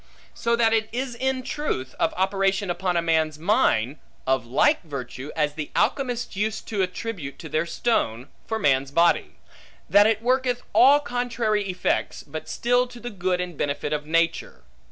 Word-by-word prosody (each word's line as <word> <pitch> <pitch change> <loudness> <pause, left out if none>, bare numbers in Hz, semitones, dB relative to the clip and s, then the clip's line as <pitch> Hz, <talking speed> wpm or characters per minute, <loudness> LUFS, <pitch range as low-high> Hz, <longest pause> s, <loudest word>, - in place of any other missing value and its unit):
So 235 0 0
that 230 -1 +3
it 220 -1 +1
is 255 +1 -3
in 260 +2 -1
truth, 250 - -3
of 160 - +2
operation 195 0 +1
upon 180 0 -1
a 170 - +1
man's 160 -2 +1
mind, 155 - +1 0.3
of 130 -3 0
like 295 - +3
virtue 140 -3 -7
as 150 -2 +1
the 150 -1 -5
alchemists 245 -5 0
use 215 +2 -1
to 210 -3 -3
attribute 180 -5 -4
to 160 - -8
their 155 +2 -1
stone, 130 - 0 0.2
for 220 - -1
man's 135 -8 +2
body; 170 +4 +2 0.5
that 205 +1 +6
it 220 0 0
worketh 250 0 +1
all 285 +3 +7
contrary 235 -6 -1
effects, 180 0 -1
but - - -8
still 245 +1 +2
to 245 0 -12
the 240 0 -6
good 185 -2 -1
and 180 -2 -4
benefit 145 +1 -2
of 150 0 -3
nature. 165 +1 0
190 Hz, 170 wpm, -24 LUFS, 155-235 Hz, 0.5 s, all